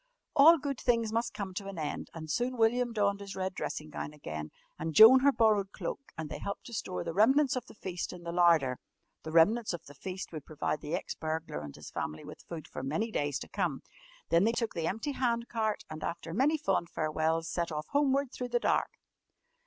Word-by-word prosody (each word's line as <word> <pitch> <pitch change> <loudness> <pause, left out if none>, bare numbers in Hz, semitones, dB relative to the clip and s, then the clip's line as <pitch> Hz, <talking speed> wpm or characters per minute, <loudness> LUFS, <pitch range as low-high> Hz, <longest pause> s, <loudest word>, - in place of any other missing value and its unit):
All 315 +3 +8
good 275 -3 -3
things 230 -3 +1
must 230 +1 0
come 195 -2 -4
to 195 +2 -5
an 195 -2 -7
end, 150 -2 -4
and 160 -1 -6
soon 245 +9 -1
William 240 +2 +3
donned 200 -2 +1
his 200 -1 -7
red 190 0 -2
dressing 155 -3 -5
gown 150 - -5
again 80 - -6 0.3
and 160 0 -3
Joan 225 +4 +10
her 280 +2 +5
borrowed 210 -5 +3
cloak, 275 - -6
and 160 -1 -4
they - - -6
helped 200 - -5
to 240 - -9
store 185 -5 -3
the 165 -1 -4
remnants 265 - +4
of 255 0 -4
the - - -14
feast 180 -3 -4
in 180 -1 -10
the 170 - -4
larder 165 -7 +4 0.4
the 160 - -7
remnants 205 +7 +4
of 175 - -6
the 145 - -12
feast 185 +6 -6
would 155 -4 -6
provide 155 0 -3
the 155 +3 -2
ex - - -4
burglar 155 - -4
and 75 -2 -8
his - - -10
family 75 +1 -4
with - - -10
food 165 -3 -6
for - - -6
many 160 - -1
days 145 -7 0
to - - -7
come. - - -2 0.5
Then 170 +2 +4
they 225 +2 +3
took 230 -1 -1
the 165 -1 -2
empty 225 - -2
hand 235 -3 0
cart 220 -2 -1
and, 155 0 -7
after 165 -1 -4
many 280 - +3
fond 195 - 0
farewells, 160 +1 0
set 170 0 -2
off 150 0 -3
homeward 280 -2 +2
through 250 -2 -5
the 240 0 +1
dark. - - +1
195 Hz, 225 wpm, -31 LUFS, 160-235 Hz, 0.5 s, Joan